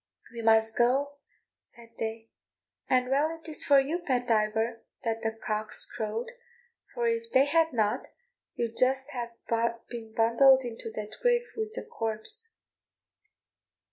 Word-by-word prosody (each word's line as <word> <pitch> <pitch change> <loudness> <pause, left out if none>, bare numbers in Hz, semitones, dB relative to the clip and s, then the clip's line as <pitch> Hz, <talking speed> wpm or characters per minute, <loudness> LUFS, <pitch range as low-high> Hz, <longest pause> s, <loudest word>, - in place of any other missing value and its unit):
"We 235 - -5
must 225 0 +4
go," 275 +4 +2 0.4
said 230 -1 -13
they, 225 0 -4 0.6
"and 250 -1 +3
well 310 +4 +1
is 315 -2 -1
it - - 0
for 280 -1 +7
you, 295 +6 -1
Pat 255 -7 -1
Diver, 220 +1 +1 0.2
that 225 -1 -1
the 225 - 0
cocks 215 -1 -3
crowed, 225 - -4 0.6
for 480 -1 0
if 460 0 -1
they 265 - +5
had 325 +2 +3
not, 215 -4 0 0.5
you'd 230 -1 -2
just 265 +2 +2
ha' 240 -3 -4 0.6
been 230 -2 -7
bundled 260 +4 +5
into 230 -2 -6
that 215 0 -6
grave 485 0 +2
with 440 -1 -3
the - - -4
corpse." 425 - -4
245 Hz, 140 wpm, -29 LUFS, 225-290 Hz, 0.6 s, for